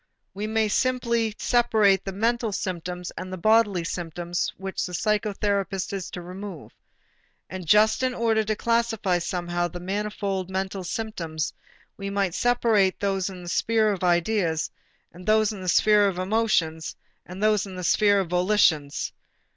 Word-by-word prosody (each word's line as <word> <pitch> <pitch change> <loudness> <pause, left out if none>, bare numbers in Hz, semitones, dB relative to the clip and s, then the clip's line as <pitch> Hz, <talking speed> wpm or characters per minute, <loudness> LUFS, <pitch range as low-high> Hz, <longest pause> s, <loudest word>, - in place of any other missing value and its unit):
We 215 +2 0
simply 235 -2 0
separate 220 -5 +3
the 195 - -3
mental 230 +3 0
symptoms 180 -2 -4
and 185 - -7
the 185 - -4
bodily 210 -2 +3
symptoms 175 0 -3
which 190 0 -4
the 180 - -5
psychotherapist 200 -2 -1
is 195 -2 -4
to 175 - -7
remove. 185 -2 -8 0.8
And 185 -2 -6
just 215 +6 +4
in 255 -1 0
order 225 -2 +2
to 215 +1 0
classify 225 -6 +1
somehow 175 0 -2
the 175 +1 -8
manifold 195 0 -3
mental 190 0 -3
symptoms, 170 -6 -3 0.4
we 200 0 -4
might 200 -3 0
separate 225 -5 +2
those 195 -1 0
in 180 -2 -9
the 175 - -6
sphere 220 +3 +2
of 190 -2 -4
ideas, 175 -2 +1 0.4
those 215 +4 +1
in 200 - -8
the 185 - -2
sphere 210 +2 +5
of 190 -3 -2
emotions, 185 -5 0 0.3
and 185 +3 -6
those 215 -2 +2
in 190 - -8
the 180 - -6
sphere 205 +3 +4
of 190 - -4
volitions. 180 -6 +2
195 Hz, 150 wpm, -25 LUFS, 180-215 Hz, 0.8 s, sphere